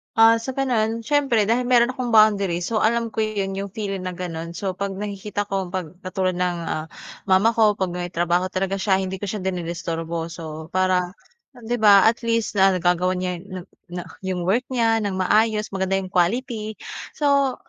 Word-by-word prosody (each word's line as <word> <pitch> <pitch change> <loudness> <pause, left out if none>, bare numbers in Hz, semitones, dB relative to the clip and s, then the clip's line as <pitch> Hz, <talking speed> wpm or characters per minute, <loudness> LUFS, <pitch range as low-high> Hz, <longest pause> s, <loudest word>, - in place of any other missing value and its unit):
Ah, 225 0 +6
so, 255 +3 -5
gano'n, 230 -4 0
siyempre 270 -4 +2
dahil 235 +4 +1
meron 245 0 +4
akong 250 -2 -4
boundary, 200 -5 +4
so, 220 +4 0
alam 230 +1 +1
ko - - -5
'yon 200 -3 -1
yung 200 +1 -3
feeling 195 -4 -4
na 185 -1 -4
gano'n. 170 -2 -5
So, 190 +2 -2
'pag 200 -1 -2
nakikita 205 +1 -4
ko, 195 -1 -1
'pag 175 -2 -5
katulad 185 -1 -1
ng, 180 -1 0
ah, 155 -1 -3 0.4
mama 190 +4 +4
ko, 220 -2 +3
'pag 190 -3 -2
may 175 0 -4
trabaho 175 +2 +1
talaga 190 +1 -2
siya, 190 -1 +2
hindi 190 0 -4
ko 205 - -4
siya 195 0 -4
dinidisturbo. 170 -2 -3
So, 160 -1 -8
para, 185 -1 +1 0.5
ah, - - -13
'di 240 +2 0
ba, 200 -2 +7
at 230 +1 +1
least, 230 -1 0
na 195 -1 +5
nagagawan 180 +1 +1
niya 180 0 -2 0.2
na 185 -1 -6 0.3
na 175 0 -5 0.2
yung 185 -2 -3
work 210 +7 +1
niya, 230 -3 +2
nang 200 -2 -2
maayos, 215 +3 +2
maganda 190 0 0
yung 190 -1 -4
quality. 215 +4 0 0.4
So, 280 -3 +2
195 Hz, 190 wpm, -23 LUFS, 180-225 Hz, 0.5 s, ba